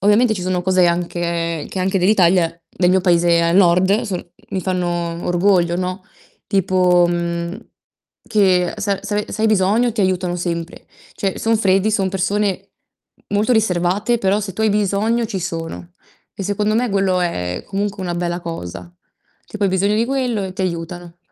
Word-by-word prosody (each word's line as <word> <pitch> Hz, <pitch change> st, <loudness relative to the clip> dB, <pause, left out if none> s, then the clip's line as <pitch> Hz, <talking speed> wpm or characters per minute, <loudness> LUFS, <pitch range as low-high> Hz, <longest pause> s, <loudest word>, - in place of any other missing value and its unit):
ovviamente 215 Hz, +4 st, +4 dB
ci 190 Hz, -, -3 dB
sono 180 Hz, 0 st, -1 dB
cose 185 Hz, -1 st, +3 dB
anche 170 Hz, -2 st, -2 dB
che 190 Hz, -, -5 dB
anche 190 Hz, +1 st, +1 dB
dell'Italia, 180 Hz, -3 st, +3 dB, 0.2 s
del 180 Hz, -1 st, 0 dB
mio 185 Hz, 0 st, +3 dB
paese 170 Hz, -2 st, +3 dB
al 170 Hz, +1 st, +1 dB
nord, 185 Hz, +3 st, +4 dB
sono 195 Hz, -6 st, -4 dB, 0.3 s
mi 190 Hz, -, -2 dB
fanno 175 Hz, -2 st, -2 dB
orgoglio, 175 Hz, -1 st, +2 dB
no. 185 Hz, +1 st, -3 dB, 0.4 s
Tipo, 180 Hz, -2 st, +3 dB
mhmm, 170 Hz, +2 st, -2 dB, 0.7 s
che 185 Hz, -4 st, +2 dB
se 205 Hz, -1 st, -2 dB
a 195 Hz, -, -4 dB
se 210 Hz, -, -4 dB
ave 210 Hz, -, -3 dB
se 220 Hz, -, -3 dB
hai -, -, +4 dB
bisogno 215 Hz, +4 st, +2 dB
ti 220 Hz, -, -2 dB
aiutano 185 Hz, -2 st, 0 dB
sempre. 170 Hz, 0 st, -4 dB, 0.3 s
Cioè, 195 Hz, -2 st, -3 dB
son 225 Hz, -1 st, +1 dB
freddi, 195 Hz, +1 st, +2 dB
son 195 Hz, -3 st, +1 dB
persone 195 Hz, +1 st, -1 dB, 0.6 s
molto 215 Hz, +5 st, +2 dB
riservate, 200 Hz, +1 st, +1 dB
però 200 Hz, -1 st, +1 dB
se 195 Hz, -3 st, -6 dB
tu 220 Hz, -, -2 dB
hai 215 Hz, -, +3 dB
bisogno 210 Hz, +3 st, +1 dB
ci 200 Hz, -4 st, -4 dB
sono. 165 Hz, 0 st, -5 dB, 0.4 s
E 200 Hz, -, -5 dB
secondo 210 Hz, +2 st, 0 dB
me 245 Hz, +2 st, +1 dB
quello 195 Hz, -3 st, +1 dB
è 90 Hz, -, -2 dB
comunque 200 Hz, 0 st, -3 dB
una 175 Hz, -1 st, -3 dB
bella 175 Hz, 0 st, -2 dB
cosa. 165 Hz, -, -7 dB, 0.5 s
Tipo 210 Hz, -1 st, -4 dB
hai -, -, +3 dB
bisogno 195 Hz, +3 st, +1 dB
di 225 Hz, +2 st, +1 dB
quello, 250 Hz, -6 st, -1 dB
e 185 Hz, -1 st, -6 dB
t'aiutano. 175 Hz, -1 st, -4 dB
185 Hz, 170 wpm, -19 LUFS, 175-205 Hz, 0.7 s, ovviamente